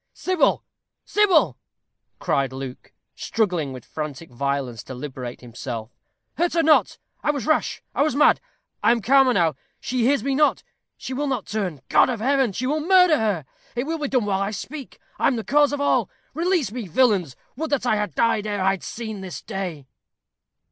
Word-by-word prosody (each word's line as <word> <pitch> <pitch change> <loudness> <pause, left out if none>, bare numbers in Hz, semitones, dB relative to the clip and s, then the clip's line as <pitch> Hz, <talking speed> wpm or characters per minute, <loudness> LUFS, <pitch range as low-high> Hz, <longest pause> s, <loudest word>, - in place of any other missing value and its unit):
"Sybil, 370 -2 +1 0.4
Sybil!" 410 -6 +3 0.6
cried 135 -2 0
Luke, 130 -1 -8 0.2
struggling 180 -10 -1
with 130 -2 -9
frantic 155 -1 -6
violence 135 -3 -2
to 130 - -7
liberate 125 -2 -7
himself; 120 -1 -6 0.5
"hurt 345 +1 +2
her 335 -1 +2
not. 315 -1 +4 0.2
I - - -1
was 285 -3 -1
rash. 310 0 0
I - - 0
was 295 -2 +2
mad. 295 - +5 0.4
I - - +4
am 235 -2 +2
calmer 270 +2 +5
now. 170 -8 +2 0.3
She 250 -1 -2
hears 265 -1 +2
me 275 +1 0
not 295 +2 +2 0.3
she 260 - -6
will 290 +3 -1
not 260 -6 -2
turn. 185 -10 -3
God - - +5
of 240 -3 -2
heaven! 265 0 +2
she 235 +7 -3
will 300 +4 0
murder 360 -1 +5
her. 205 - 0 0.3
It 245 +2 -1
will 325 +2 -2
be 295 - -1
done 255 -5 +1
while 195 -1 0
I 195 - 0
speak. 265 +7 -7 0.2
I - - +3
am 265 - +2
the 225 - -3
cause 290 +3 +3
of 290 - -2
all. 285 - +2 0.2
Release 335 - +1
me, 235 -3 -5
villains! 185 - +2 0.2
Would 315 +4 -3
that 280 -3 0
I 245 - +3
had 210 0 -2
died 225 -2 +2
ere 205 -1 -2
I 190 +1 +3
had 195 - -4
seen 220 -3 -6
this 185 -2 -7
day." 185 -9 -5
225 Hz, 190 wpm, -23 LUFS, -, 0.6 s, mad